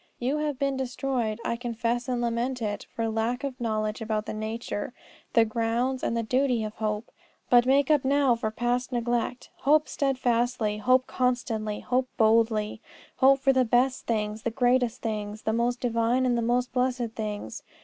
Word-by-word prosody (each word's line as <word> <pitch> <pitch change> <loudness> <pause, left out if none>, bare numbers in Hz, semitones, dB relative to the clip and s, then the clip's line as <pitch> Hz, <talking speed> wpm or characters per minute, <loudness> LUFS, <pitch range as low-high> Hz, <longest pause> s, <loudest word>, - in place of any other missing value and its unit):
You 265 +5 -1
have 300 -3 -2
been 275 0 0
destroyed, 250 -3 -2
I - - 0
confess 240 +1 -2
and 245 -1 0
lament 240 +2 -1
it, 210 -3 -3
for 230 -2 -1
lack 225 +4 -1
of 265 -3 -5
knowledge 215 -1 -1
about 215 -1 -2
the - - -4
nature, 220 +1 -4 0.4
the 230 -1 +5
grounds, 235 +4 -1
and 230 - -1
the 230 - 0
duty 250 0 +1
of 215 0 -4
hope. 215 0 -3 0.4
But 245 0 +6
make 275 +2 +4
up 295 -3 +4
now 275 -1 +3
for 225 -1 -2
past 240 +3 -1
neglect. 240 +1 -2
Hope 300 +2 +3
steadfastly, 245 -5 0
hope 255 +4 +3
constantly, 235 -5 -1
hope 255 +1 0
boldly; 220 -1 +2 0.4
hope 270 +1 +5
for 270 0 +4
the 260 -1 +4
best 250 +2 +1
things, 215 -1 -1
the 235 - -1
greatest 245 0 +1
things, 210 -1 -4
the 220 - 0
most 240 +2 0
divine 240 +1 +1
and 245 -1 +2
the 235 - 0
most 245 +2 0
blessed 250 -2 0
things. 210 -2 -5
240 Hz, 175 wpm, -27 LUFS, 220-255 Hz, 0.4 s, But